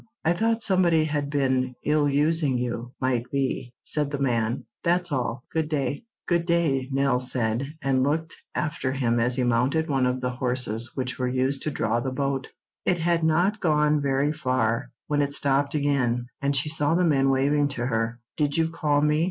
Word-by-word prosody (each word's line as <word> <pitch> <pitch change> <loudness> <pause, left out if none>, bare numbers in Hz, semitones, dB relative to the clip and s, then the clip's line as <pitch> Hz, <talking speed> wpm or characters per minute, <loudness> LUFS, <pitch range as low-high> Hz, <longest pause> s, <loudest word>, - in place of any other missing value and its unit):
"I 165 - +4
thought 225 +4 +1
somebody 175 -5 +3
had 145 -2 -2
been 130 -3 0
ill 150 0 +2
using 145 -1 +2
you, 120 0 -3
might 125 -2 -1
be," 130 -2 -2
said 150 -2 +1
the 145 - -3
man. 120 -4 0 0.2
"That's 175 0 +1
all. 125 -2 -2
Good 160 -2 0
day." 140 - -2 0.2
"Good 170 -1 +1
day," 145 -6 +1
Nell 135 -2 +2
said, 125 +3 -1
and 135 -1 +2
looked 160 +4 -1 0.2
after 150 -4 -2
him 120 -3 +1
as 120 +1 +2
he 130 - 0
mounted 125 +7 +1
one 135 -2 +2
of 125 0 -1
the 125 0 -2
horses 125 -2 0
which 130 -1 -3
were 125 - 0
used 130 +2 0
to - - -1
draw 115 -5 0
the 130 - -2
boat. 135 0 -2 0.4
It 180 - +1
had 170 0 +1
not 175 +7 +2
gone 150 -3 +2
very 140 +2 +1
far 125 -5 0 0.2
when 145 -1 0
it 140 0 0
stopped 140 0 +1
again, 125 -5 0
and 140 0 +1
she 140 +2 +2
saw 150 0 +1
the 180 +1 +3
men 135 -4 +3
waving 145 +2 +2
to 120 -4 -3
her. 115 0 -1 0.2
"Did 145 -1 0
you 165 0 +2
call 150 -3 +1
me?" 150 +1 +2
140 Hz, 190 wpm, -25 LUFS, 125-155 Hz, 0.4 s, I